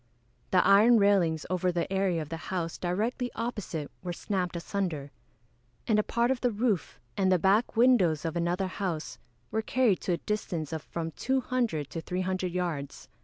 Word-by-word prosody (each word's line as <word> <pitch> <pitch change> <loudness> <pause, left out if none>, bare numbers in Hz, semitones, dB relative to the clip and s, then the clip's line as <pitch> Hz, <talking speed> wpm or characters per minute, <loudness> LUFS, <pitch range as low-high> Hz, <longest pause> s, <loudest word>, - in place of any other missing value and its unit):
The 185 - +4
iron 210 +5 +7
railings 190 -7 +3
over 185 0 +1
the 175 +2 -2
area 190 -4 +1
of 150 - -12
the 165 - -4
house 170 -3 -3
directly 220 +8 -1
opposite 210 -10 -4
were 180 - -4
snapped 180 -1 -2
asunder; 170 -5 -3 0.7
and 220 -3 +3
a - - +3
part 235 +3 +1
of 265 - -1
the 245 - +3
roof, 215 -4 -1 0.2
and 190 -1 +2
the 185 - +5
back 200 +7 +2
windows 190 - +4
of 165 - -2
another 175 +3 0
house, 185 -4 -4 0.3
were 220 - 0
carried 230 -3 +2
to 180 - 0
a - - 0
distance 170 -7 -3
of 160 - -3
from 165 +1 -5
200 245 - -1
to 165 - -4
300 185 +1 -2
yards. 170 -6 -4
185 Hz, 170 wpm, -29 LUFS, 170-215 Hz, 0.7 s, iron